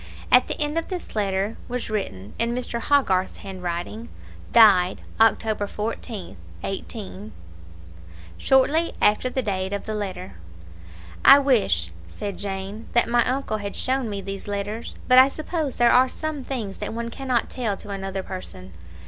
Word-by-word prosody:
At -, -, +6 dB
the -, -, -3 dB
end 300 Hz, +2 st, +1 dB
of 330 Hz, -, -6 dB
this 360 Hz, -9 st, -6 dB
letter 200 Hz, 0 st, 0 dB
was 245 Hz, -2 st, -4 dB
written, 100 Hz, -, -4 dB
in 235 Hz, +1 st, 0 dB
Mr. 245 Hz, -1 st, -3 dB
Hogarth's 195 Hz, -11 st, +2 dB
hand 190 Hz, -1 st, -7 dB
writing, 180 Hz, +6 st, -4 dB, 0.4 s
"Died, 195 Hz, -6 st, +6 dB, 0.2 s
October 220 Hz, -1 st, +3 dB
14th, 210 Hz, -, -5 dB, 0.3 s
18 200 Hz, +1 st, -6 dB, 0.5 s
," 85 Hz, 0 st, -18 dB
shortly 295 Hz, +5 st, +3 dB
after 210 Hz, +4 st, +3 dB
the 260 Hz, 0 st, -2 dB
date 190 Hz, -2 st, -2 dB
of 200 Hz, -, -3 dB
the 220 Hz, -, -4 dB
letter. 185 Hz, -, -5 dB, 0.9 s
"I 275 Hz, -, +10 dB
wish," 205 Hz, -, +2 dB, 0.2 s
said 200 Hz, -, -6 dB
Jane, 195 Hz, +2 st, -5 dB
"that 240 Hz, -, +4 dB
my 240 Hz, 0 st, +3 dB
uncle 260 Hz, -4 st, -1 dB
had 200 Hz, -1 st, -5 dB
shown 260 Hz, -2 st, -1 dB
me 200 Hz, -1 st, -4 dB
these 195 Hz, +1 st, -7 dB
letters; 205 Hz, +3 st, -4 dB
but 255 Hz, 0 st, +8 dB
I 260 Hz, -, +8 dB
suppose 310 Hz, 0 st, -3 dB
there 240 Hz, -1 st, +4 dB
are 255 Hz, +1 st, +5 dB
some 310 Hz, -2 st, -4 dB
things 225 Hz, -8 st, -4 dB
that -, -, -4 dB
one 235 Hz, 0 st, -3 dB
cannot 255 Hz, -1 st, -1 dB
tell 225 Hz, -6 st, -2 dB
to 210 Hz, -, -12 dB
another 195 Hz, -1 st, -4 dB
person." 95 Hz, -, -8 dB
215 Hz, 160 wpm, -24 LUFS, 190-250 Hz, 0.9 s, I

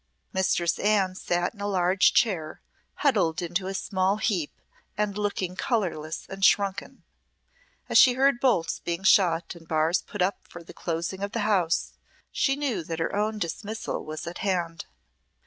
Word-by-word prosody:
Mistress 180 Hz, -2 st, +1 dB
Anne 200 Hz, -3 st, +2 dB
sat 175 Hz, -1 st, -1 dB
in 205 Hz, -, -13 dB
a 205 Hz, -, -1 dB
large 185 Hz, -1 st, +3 dB
chair, 170 Hz, -9 st, +1 dB, 0.5 s
huddled 185 Hz, -, +2 dB
into 175 Hz, +2 st, -2 dB
a 195 Hz, -, -4 dB
small 190 Hz, +1 st, 0 dB
heap, 185 Hz, -9 st, -1 dB, 0.5 s
and 210 Hz, -1 st, -1 dB
looking 200 Hz, -3 st, -2 dB
colourless 175 Hz, -10 st, -2 dB
and 195 Hz, 0 st, -7 dB
shrunken. 200 Hz, +6 st, +2 dB, 0.8 s
As -, -, +5 dB
she 255 Hz, -, +7 dB
heard 270 Hz, -1 st, +3 dB
bolts 205 Hz, -12 st, +1 dB
being 170 Hz, +2 st, -4 dB
shot 180 Hz, -5 st, +3 dB
and 165 Hz, -2 st, -15 dB
bars 160 Hz, +2 st, +2 dB
put 205 Hz, -3 st, -3 dB
up 190 Hz, +2 st, 0 dB
for 175 Hz, -, -10 dB
the -, -, -13 dB
closing 170 Hz, +3 st, -4 dB
of 200 Hz, +1 st, -3 dB
the 230 Hz, -, -1 dB
house, 190 Hz, -6 st, +1 dB, 0.4 s
she 270 Hz, -, +1 dB
knew 275 Hz, -, -2 dB
that 165 Hz, 0 st, -5 dB
her 165 Hz, -, -2 dB
own 215 Hz, +1 st, 0 dB
dismissal 210 Hz, +4 st, -4 dB
was 155 Hz, 0 st, -6 dB
at 170 Hz, +1 st, -7 dB
hand. 175 Hz, -4 st, -2 dB
190 Hz, 165 wpm, -26 LUFS, 170-210 Hz, 0.8 s, she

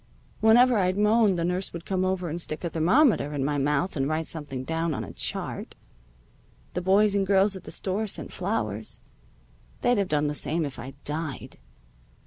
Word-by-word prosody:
Whenever 235 Hz, +1 st, +5 dB
I'd 185 Hz, 0 st, +1 dB
moan 210 Hz, -1 st, +4 dB
the 170 Hz, -1 st, -1 dB
nurse 180 Hz, +2 st, -1 dB
would 170 Hz, -1 st, -7 dB
come 185 Hz, -1 st, 0 dB
over 185 Hz, -1 st, -1 dB
and 170 Hz, +2 st, -4 dB
stick 155 Hz, 0 st, -4 dB
a 170 Hz, -, -2 dB
thermometer 165 Hz, -, +3 dB
in 135 Hz, -2 st, -1 dB
my 145 Hz, 0 st, 0 dB
mouth 145 Hz, +5 st, 0 dB
and 135 Hz, -1 st, 0 dB
write 160 Hz, +1 st, -1 dB
something 145 Hz, -6 st, -5 dB
down 165 Hz, +1 st, -1 dB
on -, -, -3 dB
a -, -, -9 dB
chart. -, -, -4 dB, 1.0 s
The 180 Hz, -, -2 dB
boys 200 Hz, +3 st, +4 dB
and 195 Hz, -1 st, +1 dB
girls 195 Hz, +1 st, +3 dB
at 190 Hz, -, -10 dB
the -, -, -8 dB
store 200 Hz, +3 st, -2 dB
sent -, -, -7 dB
flowers. 110 Hz, -, -3 dB, 0.8 s
They'd 245 Hz, -3 st, +3 dB
have 195 Hz, -, 0 dB
done 150 Hz, 0 st, +1 dB
the 145 Hz, -, 0 dB
same 160 Hz, +2 st, -1 dB
if 140 Hz, -, -7 dB
I'd 130 Hz, +3 st, -8 dB
died. 150 Hz, -2 st, -5 dB
175 Hz, 190 wpm, -26 LUFS, 150-200 Hz, 1.0 s, Whenever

